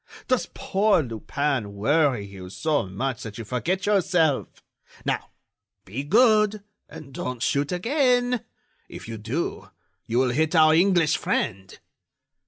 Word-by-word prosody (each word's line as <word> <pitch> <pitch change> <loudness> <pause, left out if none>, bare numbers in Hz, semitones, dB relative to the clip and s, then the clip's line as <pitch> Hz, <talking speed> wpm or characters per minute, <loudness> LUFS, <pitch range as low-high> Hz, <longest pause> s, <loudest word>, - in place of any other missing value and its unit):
Does 255 -2 0
poor 210 -8 +2
Lupin 120 -1 -2
worry 135 0 +2
you 95 -2 -10
so 150 +1 -1
much 125 +6 -3
that 110 -2 -8
you 115 - -6
forget 175 - -2
yourself?... 180 -8 +1 0.4
Now, - - -2 0.6
be 110 +9 -5
good, 215 - +3 0.3
and 150 -3 -11
don't 125 -2 -4
shoot 145 +3 0
again!... 245 - +1 0.5
If - - -10
you 115 -1 -6
do 120 +11 -4 0.4
you 115 - -1
will 130 -1 +3
hit 155 +6 0
our 155 -1 +6
English 170 -2 +3
friend." 95 -3 -2
150 Hz, 130 wpm, -24 LUFS, 115-190 Hz, 0.6 s, our